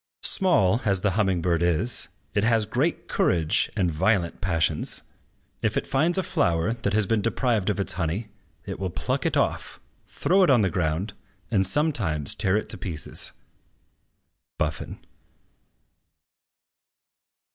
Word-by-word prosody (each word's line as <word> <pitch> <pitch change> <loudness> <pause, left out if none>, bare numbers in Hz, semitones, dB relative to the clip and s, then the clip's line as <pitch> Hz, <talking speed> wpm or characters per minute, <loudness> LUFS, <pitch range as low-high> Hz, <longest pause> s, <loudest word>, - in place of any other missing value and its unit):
"Small 120 - +3
as 100 -3 +1
the 105 - +2
humming 95 -4 +1
bird 85 -2 +1
is, 90 +8 0 0.3
it 105 - +1
has 115 -1 +3
great 135 +10 -1
courage 80 -3 +2
and 90 -2 +1
violent 90 +2 0
passions. 85 -4 0 0.6
If - - 0
it - - -1
find 160 +7 +1
a 190 - +1
flower 85 - +1
that 110 -4 -2
has 110 -1 +3
been 110 +1 +1
deprived 115 -2 0
of 105 - -1
its 100 - -1
honey, 90 +5 -2 0.4
it - - -6
will 95 -1 -2
pluck - - -2
it - - 0
off, - - -1 0.3
throw 190 +3 +2
it 185 - +5
on 125 -4 +5
the 95 -3 +1
ground, 90 +4 -1 0.4
and 100 -4 +3
sometimes 100 - 0
tear 95 +2 +1
it 110 - -3
to - - -4
pieces." 80 -5 -4 1.3
BUFFON. 75 -1 -4
100 Hz, 145 wpm, -25 LUFS, 85-115 Hz, 1.3 s, it